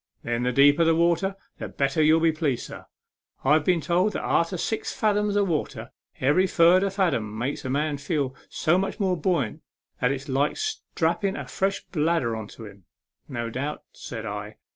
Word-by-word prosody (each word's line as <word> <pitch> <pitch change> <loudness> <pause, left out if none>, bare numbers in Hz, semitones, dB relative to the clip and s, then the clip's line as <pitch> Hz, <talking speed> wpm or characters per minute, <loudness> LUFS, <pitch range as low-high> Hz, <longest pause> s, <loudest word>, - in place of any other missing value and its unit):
" - - -46
Then 120 0 -1
the 125 0 +1
deeper 145 +5 +5
the 165 0 +3
water, 170 +4 +2 0.2
the - - -4
better 140 +3 0
you'll 155 +1 +5
be 165 0 +4
pleased, 150 -6 -1
sir. - - -10 0.6
I've 150 +3 +4
been 175 0 +2
told 180 +6 +1
that - - -3
arter 170 +2 +1
six 220 +6 -2
fadom 210 -1 +1
of 200 -1 +2
water 135 -8 -3 0.3
every 150 +9 +3
furder 180 +3 +4
fadom 145 - -1
makes 130 +5 -3
a - - -2
man 145 +2 0
feel 140 -2 -1 0.2
so 170 +4 +2
much 195 +3 -3
more 190 -3 +1
buoyant 165 - -1 0.4
that 125 - +2
it's 135 +1 -4
like 140 +2 0
strapping 220 - -1
a - - -6
fresh 195 +1 -1
bladder 155 -7 0
on 110 -2 -6
to 110 - -11
him." 100 -3 -14 0.2
" - - -67
No 120 -3 -4
doubt/' 140 +5 -4
said 115 -7 -7
I. 105 0 -6
155 Hz, 190 wpm, -25 LUFS, 130-180 Hz, 0.6 s, deeper